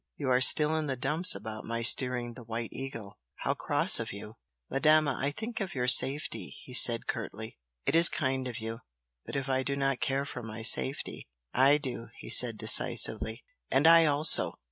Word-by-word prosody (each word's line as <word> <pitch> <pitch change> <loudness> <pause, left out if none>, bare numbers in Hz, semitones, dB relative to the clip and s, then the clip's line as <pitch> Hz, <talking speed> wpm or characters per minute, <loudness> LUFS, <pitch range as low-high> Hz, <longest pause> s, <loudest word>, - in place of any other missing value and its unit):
You 130 - -6
are 125 0 0
still 150 +3 +3
in 155 -1 -5
the 135 - -5
dumps 150 - +1
about 110 +2 -10
my 115 0 -7
steering 125 -1 +1
the 125 - -14
'White 115 0 -8
Eagle!' 115 -6 -11 0.2
how - - -5
cross - - +3
of - - -7
you!" 105 +3 -13 0.3
"Madama, 155 0 0
I 140 - -2
think 225 +10 -9
of 185 -4 -8
your 125 -1 -4
safety," 125 -6 +1
he 125 - -14
said, 120 -2 +6
curtly. 110 -3 -9 0.3
"It - - -3
is 165 +1 +5
kind 130 -3 -5
of 120 -2 -9
you! 115 0 -9 0.5
But - - -10
if 135 -1 -6
I 130 -1 -3
do 140 +1 -6
not 135 -2 -4
care 135 +1 -4
for 130 - -10
my 110 0 -11
safety?" 130 +4 +1 0.3
"I 135 +3 +2
do!" 130 -5 -9
he - - -10
said, 120 -3 +7
decisively. 110 +2 -1 0.3
"And 135 +3 -1
I 165 0 +4
also!" 150 +2 +4
130 Hz, 190 wpm, -26 LUFS, 115-145 Hz, 0.5 s, said